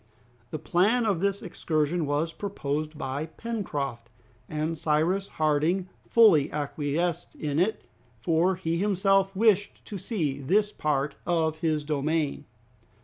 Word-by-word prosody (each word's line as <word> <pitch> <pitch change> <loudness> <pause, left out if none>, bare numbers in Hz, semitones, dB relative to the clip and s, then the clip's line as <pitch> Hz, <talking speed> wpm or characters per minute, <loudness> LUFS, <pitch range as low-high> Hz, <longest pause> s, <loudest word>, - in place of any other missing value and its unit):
The 155 - -4
plan 195 +10 +2
of 200 -6 +1
this 200 0 0
excursion 160 -2 -1
was 150 +3 0
proposed 155 -6 -3
by 140 +1 -3
Pencroft, 145 - -4 0.4
and 155 +2 -2
Cyrus 160 +6 +1
Harding 155 +5 +1 0.2
fully 190 -11 +5
acquiesced 150 +3 -2
in 150 0 -2
it, 210 +5 +1 0.4
for 165 +8 +2
he 170 -2 -2
himself 195 0 +2
wished 205 -1 +2
to 200 - -6
see 155 - -2
this 205 +10 +2
part 145 -4 -1
of 160 -2 +1
his 155 -2 0
domain. 150 0 -1
160 Hz, 125 wpm, -27 LUFS, 150-195 Hz, 0.4 s, fully